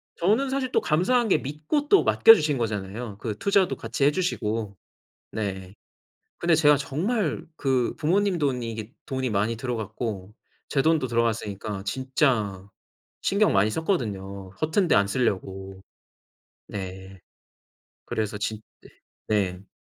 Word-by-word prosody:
저는 220 +10 +2
사실 265 -1 -1
또 - - +2
감사한 225 +10 +2
게 - - +5
믿고 150 - -2
또 400 - +6
맡겨 225 - +8
주신 150 -7 0
거잖아요, 105 -1 -4
그 105 -1 -4
투자도 200 - +2
같이 115 +4 -3
해 145 - +5
주시고. 110 - -2 0.6
네. 95 -3 -4 0.6
근데 170 -1 +3
제가 150 -2 +5
정말 160 - -1
그 130 -5 0
부모님 185 +4 +1
돈이 125 -6 -1
이게 110 +1 -7
돈이 130 -2 -2
많이 105 +3 0
들어갔고 110 -4 -4 0.3
제 135 - +1
돈도 160 -3 +2
들어갔으니까 110 -4 -2
진짜 120 - 0 0.5
신경 205 +2 +3
많이 100 +2 +3
썼거든요, 100 - -3
허튼 165 +4 +1
데 - - +4
안 100 - +4
쓰려고. 95 -4 -2 0.9
네. 95 0 -7 0.9
그래서 110 -1 -2
진 105 +1 -3 0.2
네. - - -16 0.4
네. 95 -3 -1
120 Hz, 260 characters per minute, -25 LUFS, 100-155 Hz, 0.9 s, 맡겨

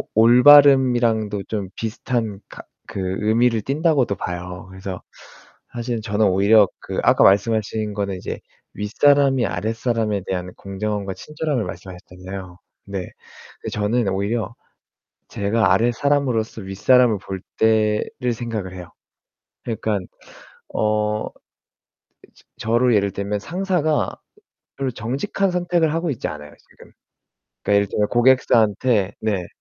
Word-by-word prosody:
올바름이랑도 120 -4 +5
좀 100 -4 -4
비슷한 110 -2 -3
가 - - -11 0.3
그 95 - -5 0.2
의미를 115 +2 +2
띤다고도 140 - +1
봐요. 90 +1 -6
그래서 95 -1 -7 0.7
사실 120 -1 -3
저는 105 0 +1
오히려 100 +2 +5
그 - - -4
아까 - - +4
말씀하신 105 +1 +2
거는 100 -2 -3
이제 - - -6 0.3
윗사람이 135 +4 +3
아랫사람에 110 -2 -2
대한 90 -1 -4
공정함과 100 0 -4
친절함을 150 -4 -3
말씀하셨잖아요. 90 0 -9 0.3
네. 95 -2 -4 0.7
저는 105 +1 0
오히려 100 +2 -2 0.7
제가 105 +3 +1
아랫사람으로서 120 -2 0
윗사람을 110 +4 +3
볼 95 -1 -7 0.2
때를 110 +2 +1
생각을 110 -5 -5
해요. 90 -2 -9 0.8
그니깐 110 -5 -3 0.7
어 105 0 0 1.3
저로 120 +2 +2
예를 100 -1 +2
들면 100 +1 -3
상사가 165 - -1 0.6
별로 135 -1 -2
정직한 135 - -2
선택을 175 -3 0
하고 165 -1 -1
있지 125 - -3
않아요. 75 -1 -9 0.2
지금. - - -18 0.7
그니까 105 - +1
예를 100 0 +2
들어 105 +1 0
고객사한테 120 -4 +2
네. 100 -5 -1
110 Hz, 280 characters per minute, -21 LUFS, 100-125 Hz, 1.3 s, 올바름이랑도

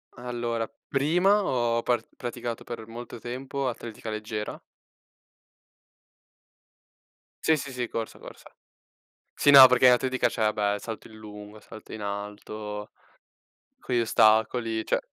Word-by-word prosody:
Allora, 120 -2 -3 0.2
prima 180 +9 +3
ho 120 -2 0
par 120 -2 0
praticato 120 -1 -5
per 115 -2 -7
molto 120 +1 -9
tempo 130 +3 -4
atletica 115 -1 -7
leggera. 110 0 -5 2.8
Sì, 160 -1 +4
sì, 140 -2 -6
sì, 125 -1 -3
corsa, 115 -1 -5
corsa. - - -13 0.8
Sì, 145 - +4
no, 135 -2 +12
perché 125 0 +5
atletica 130 +1 +2
c'è, 110 - -3
vabbè, 105 -1 0
salto 110 +1 -7
in 110 - -14
lungo, 105 0 -11
salto 110 - -13
in 110 - -7
alto, 105 +1 -6 0.9
con 125 - -4
gli 120 - +3
ostacoli, 110 0 +2
cioè - - 0
115 Hz, 125 wpm, -26 LUFS, 110-125 Hz, 2.8 s, no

